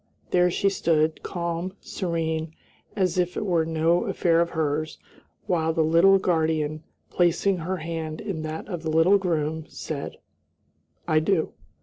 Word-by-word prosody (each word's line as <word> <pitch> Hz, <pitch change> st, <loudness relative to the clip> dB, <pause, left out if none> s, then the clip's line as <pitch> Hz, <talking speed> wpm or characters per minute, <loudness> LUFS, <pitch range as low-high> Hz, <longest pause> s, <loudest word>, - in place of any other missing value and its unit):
there 180 Hz, 0 st, +4 dB
she 195 Hz, -, 0 dB
stood, 160 Hz, -5 st, +1 dB
calm, 170 Hz, +1 st, -3 dB
serene, 160 Hz, -3 st, -3 dB, 0.4 s
as 185 Hz, -3 st, +1 dB
if 180 Hz, 0 st, 0 dB
it -, -, -2 dB
were 175 Hz, -4 st, +2 dB
no 165 Hz, +2 st, +2 dB
affair 170 Hz, -1 st, +2 dB
of 170 Hz, -, 0 dB
hers, 155 Hz, -1 st, -2 dB, 0.5 s
while 160 Hz, -2 st, +1 dB
the 160 Hz, 0 st, +1 dB
little 170 Hz, +5 st, +5 dB
guardian, 160 Hz, -4 st, 0 dB, 0.3 s
placing 180 Hz, +2 st, +2 dB
her 180 Hz, +3 st, -3 dB
hand 160 Hz, -1 st, -5 dB
in 195 Hz, -7 st, -4 dB
that 155 Hz, 0 st, -5 dB
of 175 Hz, -5 st, -5 dB
the 160 Hz, -, -3 dB
little 165 Hz, +6 st, +4 dB
groom, 160 Hz, -3 st, -1 dB
said, 145 Hz, -3 st, -6 dB, 0.9 s
"I 155 Hz, -, +4 dB
do." 160 Hz, +1 st, 0 dB
165 Hz, 145 wpm, -25 LUFS, 160-180 Hz, 0.9 s, little